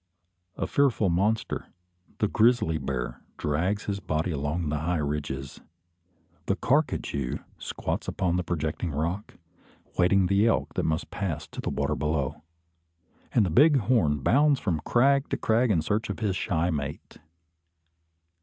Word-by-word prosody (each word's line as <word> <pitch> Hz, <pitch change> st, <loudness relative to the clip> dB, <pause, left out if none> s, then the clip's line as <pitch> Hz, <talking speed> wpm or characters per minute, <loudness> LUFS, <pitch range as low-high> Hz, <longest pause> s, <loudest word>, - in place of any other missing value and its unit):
A -, -, -1 dB
fearful 125 Hz, -9 st, +2 dB
monster, 105 Hz, +6 st, 0 dB, 0.5 s
the 105 Hz, -, +1 dB
grizzly 110 Hz, -7 st, +3 dB
bear, 65 Hz, -2 st, -4 dB, 0.2 s
drags 90 Hz, +8 st, 0 dB
his 100 Hz, -1 st, -3 dB
body 85 Hz, -2 st, -1 dB
along 75 Hz, +2 st, -2 dB
the 75 Hz, 0 st, -1 dB
high 85 Hz, +3 st, 0 dB
ridges; 70 Hz, -2 st, -4 dB, 0.9 s
the -, -, +2 dB
carcajou 65 Hz, -3 st, 0 dB, 0.2 s
squats -, -, -3 dB
upon 90 Hz, -2 st, 0 dB
the 90 Hz, -, 0 dB
projecting 85 Hz, 0 st, -2 dB
rock, 85 Hz, +7 st, -3 dB, 0.6 s
waiting 95 Hz, +2 st, +4 dB
the 100 Hz, +4 st, +3 dB
elk 115 Hz, -, +1 dB
that -, -, -1 dB
must 80 Hz, 0 st, -1 dB
pass 80 Hz, -7 st, -3 dB
to -, -, -6 dB
the -, -, -2 dB
water 70 Hz, +1 st, -1 dB
below; 75 Hz, -2 st, -1 dB, 0.9 s
and 110 Hz, -, +3 dB
the 90 Hz, -, -1 dB
bighorn 115 Hz, -, +4 dB
bounds 145 Hz, -, +4 dB
from 85 Hz, -7 st, -1 dB
crag 140 Hz, +3 st, +3 dB
to -, -, -1 dB
crag 115 Hz, +2 st, +2 dB
in 85 Hz, -7 st, +2 dB
search 105 Hz, +6 st, -1 dB
of -, -, -3 dB
his 105 Hz, -5 st, -1 dB
shy 85 Hz, -1 st, 0 dB
mate. 75 Hz, -2 st, -5 dB
90 Hz, 145 wpm, -27 LUFS, 75-105 Hz, 0.9 s, waiting